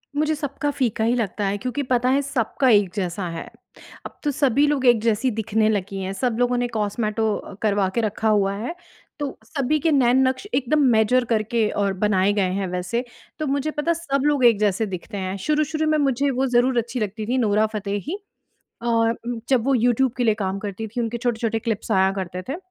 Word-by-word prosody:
मुझे 305 Hz, +1 st, +1 dB
सबका 290 Hz, 0 st, -3 dB
फ़ीका 245 Hz, -6 st, -1 dB
ही 235 Hz, +2 st, +2 dB
लगता 210 Hz, -3 st, -2 dB
है 200 Hz, +1 st, -1 dB
क्योंकि 255 Hz, +6 st, -3 dB
पता 250 Hz, 0 st, +3 dB
है 275 Hz, +2 st, +3 dB
सबका 265 Hz, -1 st, 0 dB
एक 205 Hz, -4 st, +4 dB
जैसा 185 Hz, -1 st, -2 dB
है। 165 Hz, -1 st, -6 dB, 0.6 s
अब -, -, -10 dB
तो 295 Hz, -, +1 dB
सभी 280 Hz, 0 st, +2 dB
लोग 285 Hz, -3 st, 0 dB
एक 240 Hz, -3 st, +5 dB
जैसी 230 Hz, +3 st, +1 dB
दिखने 220 Hz, 0 st, 0 dB
लगी 200 Hz, -2 st, -2 dB
हैं, 190 Hz, +1 st, -3 dB
सब 245 Hz, +2 st, -1 dB
लोगों 245 Hz, 0 st, +2 dB
ने 245 Hz, 0 st, 0 dB
कॉस्मेटो 215 Hz, -1 st, -1 dB
अ, -, -, -8 dB
करवा 205 Hz, -3 st, +2 dB
के 235 Hz, -, +2 dB
रखा 215 Hz, 0 st, -1 dB
हुआ 200 Hz, -2 st, +2 dB
है 235 Hz, +12 st, -4 dB, 0.4 s
तो 285 Hz, -2 st, -4 dB
सभी 280 Hz, +4 st, 0 dB
के 320 Hz, +2 st, +1 dB
नैन-नक्श 260 Hz, +2 st, +3 dB
एकदम 280 Hz, +3 st, +1 dB
मेजर 235 Hz, +3 st, +3 dB
करके 225 Hz, 0 st, +1 dB
और 200 Hz, -1 st, 0 dB
बनाए 195 Hz, 0 st, +2 dB
गए 195 Hz, -3 st, +1 dB
हैं, 195 Hz, 0 st, -2 dB
वैसे 180 Hz, +6 st, -2 dB, 0.4 s
तो 310 Hz, -, -2 dB
मुझे 280 Hz, +2 st, -1 dB
पता 300 Hz, +3 st, -1 dB
है -, -, +4 dB
सब 280 Hz, -5 st, -1 dB
लोग 290 Hz, -4 st, +3 dB
एक 230 Hz, -4 st, +5 dB
जैसे 210 Hz, +1 st, +1 dB
दिखते 195 Hz, +2 st, -6 dB
हैं। 190 Hz, 0 st, -3 dB
शुरू-शुरू 305 Hz, +1 st, +1 dB
में 310 Hz, -, +3 dB
मुझे 280 Hz, -1 st, +1 dB
वो 265 Hz, +1 st, 0 dB
ज़रूर 245 Hz, 0 st, +2 dB
अच्छी 235 Hz, +2 st, -1 dB
लगती 215 Hz, 0 st, -3 dB
थी, 245 Hz, +4 st, 0 dB
नोरा 215 Hz, -3 st, +3 dB
फतेही 210 Hz, -, -3 dB, 0.7 s
और 230 Hz, -1 st, +2 dB, 0.2 s
उम, 240 Hz, -1 st, -3 dB
जब 255 Hz, -4 st, +2 dB
वो 275 Hz, +1 st, +2 dB
यूट्यूब 245 Hz, +1 st, +2 dB
के 245 Hz, -, 0 dB
लिए 220 Hz, -2 st, +3 dB
काम 195 Hz, -2 st, -2 dB
करती 205 Hz, +2 st, -5 dB
थी 230 Hz, +3 st, -4 dB
उनके 235 Hz, 0 st, -2 dB
छोटे-छोटे 230 Hz, -2 st, -1 dB
क्लिप्स 225 Hz, -1 st, -3 dB
आया 190 Hz, -1 st, +4 dB
करते 185 Hz, -2 st, -5 dB
थे। 275 Hz, -, -2 dB
230 Hz, 210 wpm, -23 LUFS, 205-265 Hz, 0.7 s, एक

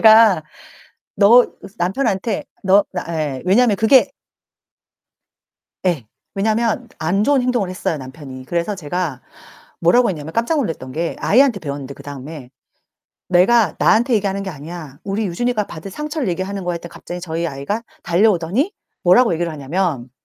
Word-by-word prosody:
제가 220 Hz, -6 st, +7 dB, 0.7 s
"너" 235 Hz, +5 st, +7 dB
그래서 195 Hz, -, -13 dB
남편한테 195 Hz, +2 st, -1 dB, 0.2 s
"너 195 Hz, +2 st, +5 dB
나" 180 Hz, -, -3 dB
예 150 Hz, -5 st, -2 dB
왜냐면 215 Hz, +3 st, +4 dB
그게 225 Hz, +6 st, +5 dB, 1.8 s
예. 160 Hz, -10 st, 0 dB, 0.3 s
왜냐면 220 Hz, +4 st, 0 dB
안 190 Hz, +6 st, +1 dB
좋은 280 Hz, +1 st, +3 dB
행동을 245 Hz, -6 st, 0 dB
했어요 185 Hz, -3 st, -2 dB
남편이. 130 Hz, -1 st, -9 dB
그래서 175 Hz, +6 st, -1 dB
제가 165 Hz, -5 st, -3 dB, 0.6 s
뭐라고 215 Hz, +7 st, +4 dB
했냐면 160 Hz, -2 st, -5 dB
깜짝 235 Hz, +8 st, +1 dB
놀랐던 160 Hz, -, -3 dB
게 165 Hz, +4 st, -2 dB
아이한테 250 Hz, -2 st, +4 dB
배웠는데 140 Hz, -3 st, -6 dB
그다음에. 140 Hz, -1 st, -9 dB, 0.8 s
"내가 200 Hz, +5 st, +4 dB
나한테 235 Hz, +3 st, +3 dB
얘기하는 200 Hz, -1 st, -1 dB
게 190 Hz, -, -4 dB
아니야. 155 Hz, -2 st, -9 dB
우리 205 Hz, +2 st, -2 dB
유진이가 215 Hz, +3 st, -1 dB
받은 160 Hz, +4 st, -8 dB
상처를 300 Hz, -, -3 dB
얘기하는 190 Hz, +2 st, -3 dB
거야." 175 Hz, 0 st, -1 dB
했더니 170 Hz, 0 st, -8 dB
갑자기 175 Hz, -, -7 dB
저희 170 Hz, -1 st, -2 dB
아이가 140 Hz, +10 st, -3 dB, 0.2 s
달려오더니 195 Hz, -, +2 dB, 0.3 s
뭐라고 185 Hz, +4 st, +5 dB
얘기를 170 Hz, 0 st, -1 dB
하냐면 145 Hz, -3 st, -2 dB
185 Hz, 350 characters per minute, -19 LUFS, 160-220 Hz, 1.8 s, 제가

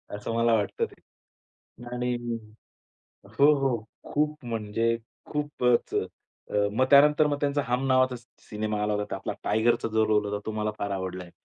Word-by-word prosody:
असं 105 Hz, +2 st, -4 dB
मला 115 Hz, 0 st, +3 dB
वाटतं 105 Hz, -3 st, +1 dB
ते. -, -, -16 dB, 0.9 s
आणि 125 Hz, 0 st, -1 dB, 1.2 s
हो, 145 Hz, +2 st, +7 dB
हो. 135 Hz, -3 st, +1 dB, 0.4 s
खूप 150 Hz, -2 st, 0 dB
म्हणजे 115 Hz, 0 st, 0 dB, 0.4 s
खूपच 145 Hz, -5 st, +1 dB
अ, -, -, +2 dB, 0.5 s
अ, 100 Hz, 0 st, +3 dB
मग 130 Hz, +3 st, +3 dB
त्यानंतर 150 Hz, +2 st, +7 dB
मग 145 Hz, -1 st, 0 dB
त्यांचा 145 Hz, 0 st, +1 dB
हम 125 Hz, +2 st, 0 dB
नावाचा 130 Hz, -1 st, +3 dB, 0.3 s
सिनेमा 105 Hz, 0 st, -2 dB
आला 105 Hz, 0 st, 0 dB
होता. 105 Hz, -1 st, -2 dB
आपला 95 Hz, -, -4 dB
टायगरचा 115 Hz, +2 st, +2 dB
जो 110 Hz, 0 st, +4 dB
रोल 105 Hz, -1 st, +2 dB
होता 105 Hz, 0 st, -2 dB
तो 110 Hz, -, -1 dB
मला 105 Hz, 0 st, 0 dB
फार 100 Hz, -, -2 dB
आवडला 95 Hz, -1 st, -4 dB
आहे. 85 Hz, -, -14 dB
115 Hz, 165 wpm, -27 LUFS, 105-135 Hz, 1.2 s, हो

